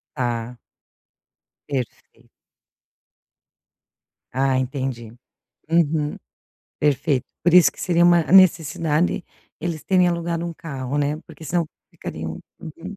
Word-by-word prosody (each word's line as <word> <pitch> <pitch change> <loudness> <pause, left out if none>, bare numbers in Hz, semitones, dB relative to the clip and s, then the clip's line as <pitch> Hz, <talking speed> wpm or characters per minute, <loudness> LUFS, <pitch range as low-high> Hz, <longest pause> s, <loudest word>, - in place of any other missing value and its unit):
Tá. 120 -2 -2 1.1
Perfeito. 130 -4 -6 2.0
Ah, 135 +1 +2
entendi, 130 -3 -3 0.6
uhum, 155 -2 +2 0.6
perfeito. 140 -2 +1 0.2
Por 175 +1 +3
isso 180 -2 +8
que - - -13
seria 175 -1 +3
uma 175 -1 +6
necessidade 165 -2 +3 0.4
eles 165 -3 -3
terem 185 -2 +4
alugado 170 -1 -2
um 170 - -4
carro, 140 -4 -4
né, 145 +1 0
porque 160 - -12
senão 170 +1 0 0.2
ficariam. 80 0 -6 0.2
Uhum. 170 +5 -9
150 Hz, 100 wpm, -22 LUFS, 130-170 Hz, 2.0 s, isso